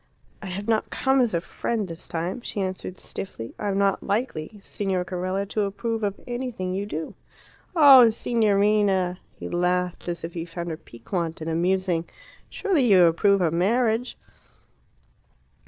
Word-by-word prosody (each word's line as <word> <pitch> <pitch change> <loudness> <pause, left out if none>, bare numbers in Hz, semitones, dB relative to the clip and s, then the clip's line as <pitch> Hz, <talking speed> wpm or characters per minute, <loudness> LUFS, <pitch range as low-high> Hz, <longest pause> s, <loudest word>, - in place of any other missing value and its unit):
"I 200 - -7
have 195 +3 -5
not 220 -1 +1
come 265 0 +2
as 235 -7 +1
a 170 - 0
friend 215 +3 -3
this 165 -1 -8
time," 175 +7 -3
she 210 - -3
answered 185 -1 -4
stiffly. 115 - -7
"I 210 - -2
am 195 -1 0
not 200 -1 +2
likely, 205 -4 -2
Signor 190 -2 -2
Carella, 185 +2 -2
to 215 - -1
approve 225 +3 -2
of 200 -2 -2
anything 240 -7 -4
you 200 +2 -3
do." 160 -5 -5 0.6
"Oh, 270 -7 +9
Signorina!" 205 -5 +2 0.2
He - - -7
laughed, 180 +1 -1
as 170 -1 -4
if 165 +1 -5
he 165 - -4
found 170 0 -6
her 160 - -4
piquant 165 - -5
and 160 +1 -4
amusing. 175 0 +1 0.4
"Surely 375 -10 +1
you 185 -3 +7
approve 195 +4 +3
of 165 -2 +1
marriage?" 225 +6 +1
190 Hz, 155 wpm, -25 LUFS, 175-215 Hz, 0.6 s, Oh